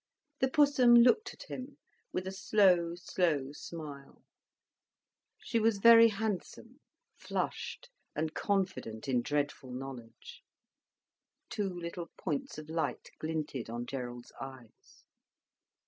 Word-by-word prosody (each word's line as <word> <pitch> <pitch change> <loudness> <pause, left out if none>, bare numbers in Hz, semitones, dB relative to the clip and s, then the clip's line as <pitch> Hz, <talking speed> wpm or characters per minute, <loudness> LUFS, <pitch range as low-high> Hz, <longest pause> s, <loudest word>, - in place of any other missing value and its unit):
The 265 - +3
Pussum 270 -4 +5
looked 245 - +5
at - - -11
him 265 +2 -8 0.3
with 185 - -2
a 190 - -3
slow, 185 -4 +3
slow 165 -6 0
smile. 145 -3 -9 1.1
She 230 - -1
was 220 -1 +3
very 230 +2 +9
handsome, 220 +4 -4 0.4
flushed, - - -4 0.2
and 155 +1 -1
confident 185 - -2
in 125 -2 +2
dreadful 145 -1 -2
knowledge. 125 -3 -9 1.1
Two 205 -2 -1
little 175 -1 -6
points 150 -5 -3
of 155 0 -8
light 155 -5 -3
glinted 155 -6 -3
on 120 +1 -4
Gerald's 120 -2 -6
eyes. 130 -4 -11
170 Hz, 110 wpm, -32 LUFS, 135-215 Hz, 1.1 s, very